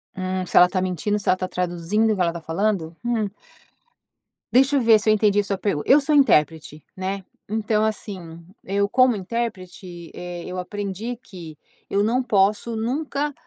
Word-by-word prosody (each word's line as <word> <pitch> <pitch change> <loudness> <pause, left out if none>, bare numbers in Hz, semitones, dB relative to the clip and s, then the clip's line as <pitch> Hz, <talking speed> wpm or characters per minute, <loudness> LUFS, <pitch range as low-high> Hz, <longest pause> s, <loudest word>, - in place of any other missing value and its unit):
Hum 185 0 -3
se - - 0
ela 180 - +8
está 185 +1 -2
mentindo, 185 +3 -1
se 205 - -5
ela - - +6
está 185 0 -4
traduzindo, 180 +5 0
o - - +1
que 185 - -2
ela 170 - +3
está 170 0 -6
falando? 165 -1 -1
Hum. 230 -4 0 1.2
Deixa 265 +3 +4
eu 275 - +3
ver 225 -2 +6
se 215 - 0
eu - - +6
entendi 205 -1 +3
sua 195 -1 -2
pergunta. 190 -8 -2
Eu 285 +3 +8
sou 295 +2 0
intérprete, 155 - +2
né. 190 +1 -4 0.3
Então 215 0 0
assim, 185 -6 -5 0.2
eu 200 +1 0
como 255 +2 +4
intérprete, 185 -5 -6
eh, 175 -1 -7
eu 185 0 -6
aprendi 205 +5 -4
que 165 -5 -11 0.3
eu 200 - +1
não 245 +4 +1
posso 210 +1 +1
nunca 280 +5 -2
200 Hz, 180 wpm, -23 LUFS, 180-225 Hz, 1.2 s, ela